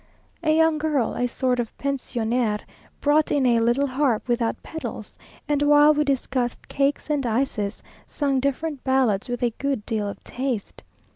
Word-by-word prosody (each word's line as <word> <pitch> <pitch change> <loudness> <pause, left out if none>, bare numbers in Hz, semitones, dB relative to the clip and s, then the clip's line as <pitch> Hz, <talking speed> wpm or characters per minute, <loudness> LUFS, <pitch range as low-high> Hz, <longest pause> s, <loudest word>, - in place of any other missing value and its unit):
A 320 - 0
young 320 0 +3
girl, 295 -6 0
a 245 - 0
sort 250 0 0
of 235 -2 -4
pensionnaire, 240 -5 -1 0.4
brought 300 +1 +3
in 280 -2 +2
a 235 -2 +4
little 240 +5 +2
harp 260 -4 0
without 240 -1 -1
pedals, 320 - -7 0.3
and 290 -1 +1
while 295 +1 +6
we 300 0 +2
discussed 260 -3 -1
cakes 280 +2 0
and 290 -2 +1
ices, 225 -4 -1 0.2
sung 275 -3 0
different 280 +1 -2
ballads 255 -6 +1
with 245 0 -3
a 240 -2 +1
good 275 -6 -1
deal 215 -2 -1
of - - -9
taste. 250 -5 -4
265 Hz, 160 wpm, -24 LUFS, 240-290 Hz, 0.4 s, while